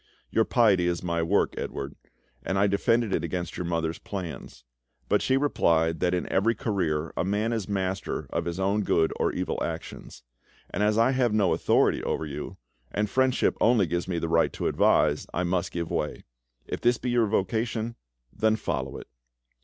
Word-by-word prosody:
Your 110 - +3
piety 100 -8 +3
is 85 0 -1
my 85 -1 0
work, 90 +5 +2
Edouard, 70 +2 -5 0.5
and 95 - -1
I 100 - +4
defended 105 +2 +2
it 80 - 0
against 85 0 -3
your 90 - -3
mother's 80 -1 -1
plans; 85 -10 -7 0.4
but - - +2
she 130 - +2
replied 80 - +2
that 90 +2 +1
in 90 - -2
every 115 +5 +2
career 85 - -1
a - - 0
man 105 +5 0
is 110 -4 -3
master 95 -1 -2
of - - -1
his 85 +1 -3
own 100 +2 +1
good 80 -5 +2
or - - +2
evil - - -2
actions; - - -7 0.5
and - - -2
as 105 +1 +2
I 115 +3 +4
have 125 -4 +1
no 100 -4 +3
authority - - +2
over 80 - -2
you, 75 0 -6 0.3
and 105 0 -1
friendship 130 -1 +2
only 115 -3 +4
gives 85 +2 -2
me 90 -2 -2
the 85 - -1
right 80 0 +3
to - - -4
advise, - - +3
I 90 - +1
must 90 0 -1
give 85 -1 -4
way. - - -2 0.4
If - - -5
this 120 +1 +3
be 125 - -3
your 120 -2 +3
vocation, 110 +3 -1 0.4
then 110 0 +2
follow - - -3
it. - - -9
95 Hz, 185 wpm, -27 LUFS, 85-110 Hz, 0.5 s, I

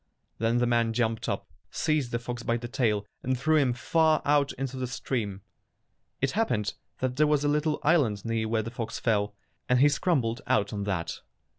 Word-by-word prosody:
Then 115 +2 +2
the 120 - +3
man 115 -1 +2
jumped 115 -1 0
up, - - -3 0.2
seized 155 -6 0
the 120 - 0
fox 120 0 -5
by 115 0 0
the 120 0 -6
tail, 110 -4 0 0.2
and 130 0 0
threw 155 +5 +3
him 135 -4 +3
far 155 +5 +2
out 145 -1 +3
into 135 0 -4
the 130 -1 -2
stream. 110 -6 -3 0.8
It 135 - +2
happened 120 - 0 0.3
that 130 0 -1
there 150 0 +4
was 150 -1 +2
a - - +2
little 150 +1 +1
island 140 - +2
near 115 -1 0
where 110 0 0
the 115 - -6
fox 115 -1 -4
fell, 105 -3 0 0.3
and 125 - +4
he 145 +4 +6
scrambled 135 -5 0
out 105 -5 +1
on 100 -1 -3
that. 85 -5 -3
120 Hz, 195 wpm, -28 LUFS, 115-145 Hz, 0.8 s, he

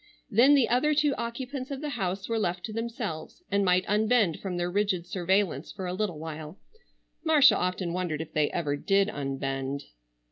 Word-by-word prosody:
Then 250 +7 +6
the 270 -5 +4
other 300 +5 +2
two 295 -1 +3
occupants 255 +3 -5
of 275 -2 -4
the 300 +1 -4
house 195 -6 -3
were 230 -1 0
left 180 -3 -1
to 215 - -6
themselves 225 - -5
and 200 0 +2
might 180 -1 +3
unbend 215 -4 +2
from 185 -3 -4
their 175 0 -1
rigid 195 -3 0
surveillance 180 -4 0
for 190 -3 -6
a 180 - -3
little 185 -4 -2
while. 155 +2 -7 0.7
Marcia 305 -4 +6
often 180 -1 -1
wondered 175 -4 -2
if 160 - -7
they 150 -1 +2
ever 150 -4 -1
did 195 +6 +2
unbend. 135 -1 -3
195 Hz, 180 wpm, -28 LUFS, 170-235 Hz, 0.7 s, Then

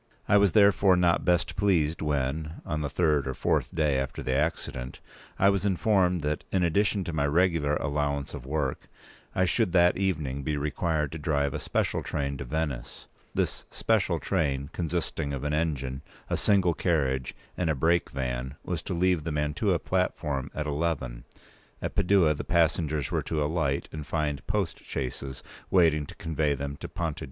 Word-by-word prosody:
I - - +4
was 100 -3 +4
therefore 100 -2 +5
not 90 -1 +3
best 90 -1 +1
pleased 85 -6 +2
when, 75 +1 -1
on 80 -2 -2
the 70 - -2
third 75 -2 +2
or 65 - -3
fourth - - +1
day 75 -4 +1
after 65 -1 -4
the 65 - -1
accident, 70 -4 -2 0.4
I 100 - +5
was 100 -2 +1
informed 95 -3 +2
that, 75 +1 -1
in 95 -2 +2
addition 100 +4 +2
to 85 - -5
my 70 -2 +1
regular 80 -2 +2
allowance 70 0 -1
of - - -6
work, 70 -1 -2 0.5
I 95 - +3
should 90 +1 +1
that 90 -1 +5
evening 75 -8 -1
be 75 +1 -1
required 75 0 -1
to 80 - -6
drive 70 -2 0
a - - -2
special - - -1
train 70 -1 -2
to 70 - -6
Venice. 70 -3 -3 0.3
This - - -1
special - - +1
train, 70 -1 -1
consisting 80 -3 -2
of 70 -1 -4
an 75 0 -1
engine, 70 -4 -1 0.3
a - - +3
single 95 -4 +3
carriage, 70 -7 0 0.2
and 90 -3 0
a 80 - +2
break 85 +5 +2
van, 65 0 -3
was - - -3
to - - -4
leave 90 -2 +2
the 80 - -3
Mantua 75 +6 +1
platform 80 -7 -1
at 75 - -2
eleven; 70 -5 -2 0.5
at - - -4
Padua 95 -4 +4
the 70 - -5
passengers 80 -3 +1
were - - +1
to 75 -2 -1
alight 75 -3 0
and 75 -2 -7
find 75 -1 -2
post - - -1
chaises 65 0 -5 0.3
waiting 80 -5 +3
to - - -11
convey 80 -3 0
them 70 +1 -4
to - - -7
Ponte 80 -3 -3
p. - - -7
75 Hz, 180 wpm, -28 LUFS, 70-85 Hz, 0.5 s, therefore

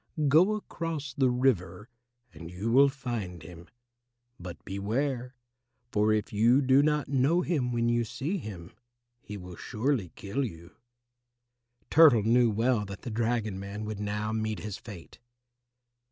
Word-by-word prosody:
Go 175 +9 +5
across 165 -8 -5
the 130 -1 +2
river 105 -6 0 0.5
and 80 +1 -10
you 95 +6 -3
will 140 +3 +6
find 115 - -5
him. 85 +1 -12 0.7
But 90 -1 -9
beware, 125 +6 -2 0.6
for 105 +1 +2
if 110 -1 -1
you 115 +5 +4
do 130 +1 +5
not 150 -2 +1
know 140 +6 +2
him 145 -9 -1
when 120 -1 0
you 120 0 +2
see 155 - -3
him, 90 - -9 0.5
he 105 - -8
will 90 -2 -9
surely 115 - -2
kill 105 +8 -3
you." 85 -6 -8 1.2
Turtle 145 -9 +7
knew 120 +2 +4
well 115 +1 +1
that 100 0 -9
the 120 - -5
dragon 110 -3 -1
man 100 +2 -6
would 105 -1 -5
now 105 +1 -2
meet 110 -1 -2
his 105 -2 -5
fate. 95 -8 -12
115 Hz, 145 wpm, -28 LUFS, 100-135 Hz, 1.2 s, Turtle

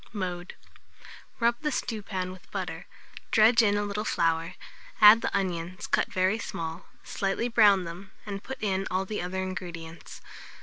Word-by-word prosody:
Mode. 180 -3 -4 0.8
Rub 235 +2 +2
the 300 -1 -1
stewpan 200 -7 -3
with 185 0 -14
butter, - - -5 0.4
dredge 225 +2 +6
in 205 -2 +3
a 205 - 0
little 205 +1 -3
flour, 165 -3 0 0.4
add 215 +1 +9
the - - 0
onions 185 0 -3
cut - - 0
very 190 +4 +1
small, 165 -6 -5 0.2
slightly 195 +4 -1
brown 210 -5 +5
them, 175 +3 -8 0.2
and 200 -1 -6
put 265 - -6
in 195 -1 0
all 185 +1 -1
the 210 +2 -4
other 185 +1 -3
ingredients. 170 -3 -7
195 Hz, 150 wpm, -28 LUFS, 180-215 Hz, 0.8 s, add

